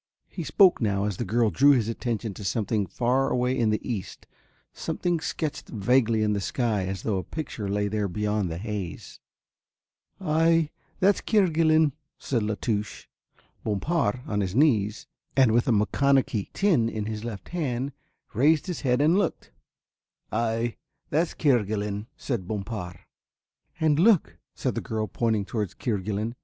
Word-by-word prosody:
He - - -5
spoke 190 -8 +5
now 100 -3 +1
as 105 -3 -2
the - - -2
girl 115 +1 +1
drew 140 - +6
his 120 -5 +1
attention 115 -2 -3
to 100 - -9
something 105 0 0
far 125 +7 +1
away 125 +1 +1
in 115 -4 +2
the 105 - -1
east, 105 -7 -5 0.5
something 175 -2 -1
sketched 155 -2 -4
vaguely 115 0 +2
in 105 -1 +2
the 100 - -1
sky 105 -3 -1
as 95 -1 -4
though 100 -4 0
a - - -5
picture 115 -10 -5
lay 105 +1 0
there 105 0 -1
beyond 105 0 -1
the 80 - -4
haze. 100 -2 -6 1.0
"Ay, 165 0 +2 0.3
that's 200 +1 +3
Kerguelen," 160 -6 +3 0.3
said 120 -4 -1
La 105 0 -1
Touche. 105 -3 -2 0.6
Bompard, 110 - 0
on 105 -1 -1
his 95 0 -2
knees, 110 -8 +2 0.3
and 130 -4 +6
with 120 +1 +2
a - - +3
maconochie 115 +1 +2
tin 160 - +2
in 110 -2 -4
his 110 0 -4
left 115 -4 -7
hand, 140 -6 -2 0.4
raised 150 +6 +3
his 180 -4 -4
head 125 -1 +2
and 165 +6 +4
looked. - - -2 0.8
"Ay, 115 +1 -1 0.3
that's 160 +4 +1
Kerguelen," 105 -6 0
said 115 -10 -3
Bompard. 100 -5 -5 0.8
"And 155 -2 +3
look," 170 - +3 0.2
said - - -1
the - - -3
girl, 110 -1 -2
pointing 110 -2 0
towards 105 -3 -3
Kerguelen. 105 0 -2
115 Hz, 155 wpm, -26 LUFS, 105-140 Hz, 1.0 s, drew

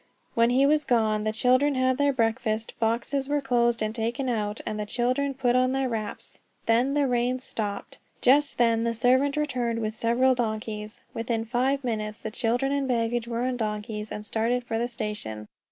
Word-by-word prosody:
While 230 0 +4
he 260 +3 +4
was 300 +1 +3
gone 220 -4 +1
the 215 - +1
children 255 +5 +3
had 255 +1 +1
their 285 0 +4
breakfast, 225 -2 -1
boxes 240 +5 0
were 290 0 +2
closed 240 -4 +1
and 215 0 -2
taken 240 +4 -2
out, 210 -2 -1
and 215 -1 -3
the 210 - -2
children 255 +4 0
put 250 -2 +1
on 255 0 +3
their 270 0 0
wraps. 220 -3 -5 0.3
Then 245 +5 +2
the 290 -1 +3
rain 250 0 +1
stopped! 210 -5 -5 0.2
Just 280 +3 +3
then 230 -1 +3
the 230 0 0
servant 260 +5 +3
returned 250 -6 -1
with 220 -1 -2
several 235 +4 +2
donkeys. 215 -2 -3
Within 225 0 -2
five 260 +4 0
minutes, 215 -3 -3
children 245 +3 0
and 280 -1 0
baggage 235 -1 0
were 235 0 -2
on 255 0 -1
donkeys, 210 -1 -4
and 210 - -6
started 230 +3 0
for 225 -2 -2
the 240 - 0
station. 210 - -5
240 Hz, 185 wpm, -26 LUFS, 220-255 Hz, 0.3 s, While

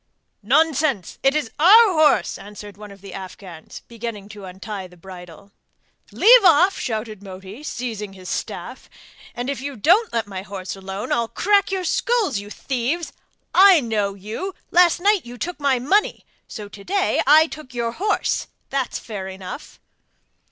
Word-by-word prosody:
'Nonsense! 305 - +1
it 270 +2 +3
is 295 -7 -1
our 410 +5 +7
horse,' 305 - +3
answered 205 0 -11
one 210 +1 -11
of 200 -1 -14
the 195 - -10
Afghans 185 -3 -10
beginning 230 -3 -7
to 205 -2 -10
untie 190 +1 -7
the 180 0 -19
bridle. 180 +1 -12 0.6
'Leave 485 +1 +7
off,' 360 +2 +5
shouted 220 -3 -4
Moti, 195 +4 -10
seizing 225 -8 -5
his 185 -1 -12
staff; - - -6 0.5
'if 260 +3 -4
you 280 0 -5
don't 360 - +3
let 230 -2 -1
my 195 -2 -6
horse 195 -1 -7
alone 195 +1 -6
I'll 235 -1 +1
crack 400 - +2
your 380 -1 -1
skulls! 395 - 0
you 205 +1 -10
thieves! 270 +9 -3 0.4
I 380 -2 +7
know 210 -6 -1
you! 220 - -6 0.2
Last 350 -1 +5
night 400 0 +2
you 245 +1 -10
took 350 +5 -5
my 280 -3 +2
money, 375 - 0 0.2
so 210 -3 -8
to 200 0 -13
day 390 - +1
I 310 +2 +7
took 305 -5 -10
your 235 -1 -1
horse; 405 - -1 0.2
that's 270 -2 -1
fair 200 -4 -7
enough! 190 +7 -9
235 Hz, 160 wpm, -21 LUFS, 200-320 Hz, 0.6 s, our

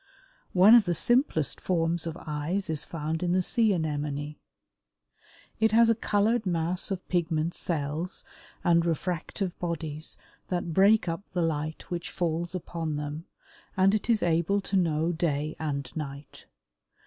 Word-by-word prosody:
One 205 +6 +8
the 175 -6 -1
simplest 240 - +2
forms 170 -1 0
of 165 0 -5
eyes 160 +4 -2
is 155 -1 -2
found 160 0 -3
in 175 -1 +1
the 185 0 +2
Sea 225 +2 +2
anemone. 150 -3 -2 1.2
It 220 -1 +3
has 230 0 +6
a - - +5
colored 215 +1 +1
mass 175 +1 0
of 190 -2 -4
pigment 165 -2 0
cells 160 +2 -3 0.4
and 170 -1 +4
refractive 175 +2 -2
bodies 160 -3 -4 0.3
that 175 -2 -2
break 200 +3 +5
up 165 +2 -2
the 175 -2 +1
light 155 0 -3
which 170 -1 -3
falls 170 +1 -2
upon 165 -3 -3
them, 150 +2 -5 0.5
and 190 +1 +5
it 215 +2 -1
is 225 -2 +3
able 170 +4 +2
to 195 - -3
know 165 -2 +2
day 155 -2 -1
and 140 -5 -3
night. 140 -2 -7
170 Hz, 145 wpm, -28 LUFS, 155-185 Hz, 1.2 s, One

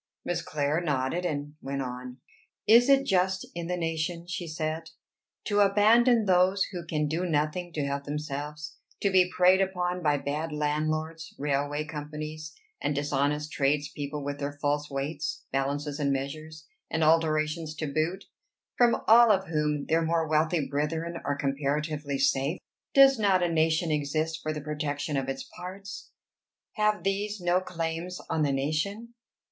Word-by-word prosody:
Miss 175 - -1
Clare 150 +2 -1
nodded, 150 +2 -1
and 145 -1 -4
went 135 0 -3
on. 125 0 -7 0.5
"Is 235 +4 +6
it 275 0 +5
just 190 0 +1
in 170 -1 -5
the 180 0 -1
nation," 165 0 -2
she 175 0 -4
said, 160 0 -3 0.5
"to 205 -1 +1
abandon 220 +4 +5
those 185 +1 +4
who 175 -3 -5
can 150 -2 0
do 160 +4 -1
nothing 165 +1 -1
to 150 -3 -1
help 140 0 -3
themselves, 150 +1 -5 0.2
to 200 - +2
be 185 -1 +5
preyed 185 +1 +5
upon 180 -1 -1
by 150 -3 +2
bad 150 +3 -3
landlords, 155 +2 -2
railway 145 +1 -1
companies, 155 0 -6 0.3
and 145 - 0
dishonest 145 +1 0
trades 145 +1 +1
people 145 0 -5
with 145 0 -4
their 140 0 -3
false 145 0 0
weights, 145 +2 -3
balances, 140 +2 -2
and 140 -1 +1
measures, 155 +3 -5 0.2
and 160 - 0
adulterations 155 0 +2
to 155 - -3
boot, 155 +6 -1 0.6
from 240 -1 +4
all 235 +1 +8
of 190 -3 +1
whom 150 -2 0
their 165 +1 +2
more 165 0 +1
wealthy 155 0 +2
brethren 160 +4 -2
are 145 0 -1
comparatively 145 +1 -1
safe? 140 +4 +1 0.4
Does 270 -2 +7
not 195 -4 +3
a 170 -1 0
nation 160 +1 +2
exist 155 +2 -1
for 155 - -2
the 155 -1 -4
protection 150 0 -3
of 135 -1 -1
its 135 - -3
parts? 195 +2 -9 0.6
Have 210 -1 +1
these 205 +2 -1
no 175 0 +2
claims 170 0 -4
on 160 - +1
the 145 -2 +2
nation? 155 +12 -2
155 Hz, 155 wpm, -28 LUFS, 145-180 Hz, 0.6 s, all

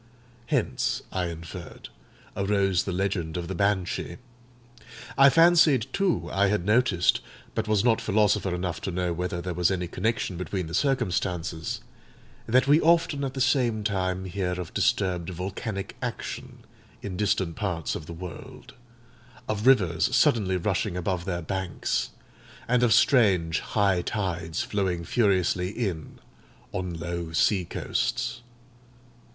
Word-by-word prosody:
Hence, - - 0
I 90 -2 -1
inferred, 85 +1 -8 0.5
arose 100 -2 +1
the 95 - -2
legend 90 -3 -2
of 85 -1 -4
the 95 - -4
Banshee. 95 -2 -1 1.0
I 135 +2 +7
fancied, 165 -5 +5
too, 195 -4 0
I 100 +1 +3
had 95 -3 0
noticed—but 105 -6 +1
was 105 -2 +2
not 115 -2 +3
philosopher 105 -3 +2
enough 90 -1 -3
to 95 - -3
know 90 -1 -1
whether 90 0 -3
there 90 - -3
was 90 0 +2
any 90 -2 -1
connection 100 0 -2
between 90 0 -3
the 80 - -8
circumstances—that 90 - -2
we 150 +3 +5
often 165 -3 +3
at 135 -1 -3
the 135 - -2
same 125 -5 +2
time 95 -2 -1
hear 90 -1 -2
of 90 -3 -6
disturbed 90 -3 +1
volcanic 95 +3 -5
action - - -6 0.4
in 100 -3 -4
distant 95 -4 0
parts 90 -8 -2
of 75 - -6
the 85 - -6
world; 85 -2 -9 0.7
of 110 +3 -1
rivers 105 -2 +4
suddenly 115 -9 +3
rushing 95 0 -1
above 90 -1 -2
their 85 -3 -3
banks; 95 0 -2 0.6
and 125 0 +2
of 120 -2 +3
strange 100 - +4
high 100 -4 +1
tides 85 -4 -2
flowing 95 -4 -1
furiously 95 -4 +1
in 95 -8 -4 0.5
on 90 -1 -3
low 85 0 -4
sea 95 +3 +3
coasts. - - -2
95 Hz, 135 wpm, -26 LUFS, 90-110 Hz, 1.0 s, I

